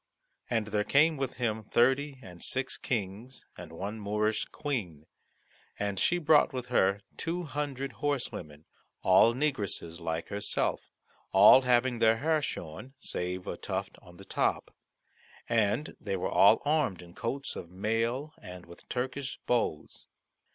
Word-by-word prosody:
And 110 -3 0
there 105 -1 +1
came 155 +7 +4
with 135 -2 -3
him 110 -3 -1
thirty 135 +6 +2
and 90 -2 -12
six 130 0 -3
Kings, 115 +3 -4
and 85 -2 -10
one 100 +6 -5
Moorish 105 +1 0
Queen, 100 - -4 0.7
and 100 -1 -2
she 175 - +3
brought 155 -2 +4
with 125 -2 -5
her 100 -2 +3 0.2
two 175 +2 -2
hundred 145 -3 -3
horsewomen, 90 - -4 0.4
all 105 +5 +6
negresses 100 - -2
like 80 -1 -3
herself, 100 0 -1 0.5
all 100 +7 +9
having 125 -1 +2
their 115 0 +4
hair 155 +4 +1
shorn 125 - -6
save 90 -5 -4
a - - -4
tuft - - -4
on 85 0 -16
the 95 - -12
top, - - -1 0.7
and 115 +4 +1
they 100 -2 -3
were 90 - -2
all - - +6
armed 145 - +1
in 85 0 -14
coats 135 +8 -3
of 85 - -7
mail 115 - -1
and 90 -1 -10
with 85 0 -15
Turkish 130 +2 -3
bows. 115 -11 -1
115 Hz, 145 wpm, -30 LUFS, 95-135 Hz, 0.7 s, all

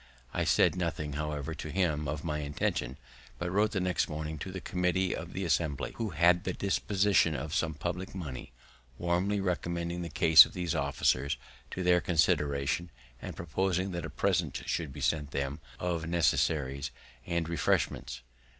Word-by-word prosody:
I - - 0
said - - +4
nothing, 80 -4 -2
however, 75 +1 -3
to 80 - -6
him 80 -4 0
of 75 +2 -3
my 75 -3 -2
intention, 70 -3 -2 0.4
but 85 0 -3
wrote 105 +3 +3
the 105 -3 -2
next 90 -1 0
morning 75 0 -4
to 95 - -5
the 95 - -5
committee 90 +1 0
of 85 +2 -7
the 95 0 -2
Assembly, 80 -3 0
who 115 -2 -2
had 85 +2 +4
the 95 - -2
disposition 100 -3 +2
of 75 +5 -4
some 80 -2 0
public 90 +5 -4
money, 70 -10 -6 0.5
warmly 90 +4 +1
recommending 85 -2 -2
the 85 - -4
case 80 +1 +9
of - - -8
these 90 -2 -2
officers 70 -2 +1 0.3
to 90 - -4
their 90 -1 +4
consideration, 75 -2 +1 0.3
and - - -6
proposing 95 +3 -1
that 85 -2 -4
a 80 - -4
present - - 0
should 80 -5 -2
be - - -8
sent 75 -2 0
them 70 +2 -3 0.2
of 85 -2 -2
necessaries 70 -4 +1 0.4
and 85 -2 -1
refreshments. 65 -6 0
85 Hz, 165 wpm, -30 LUFS, 75-90 Hz, 0.5 s, case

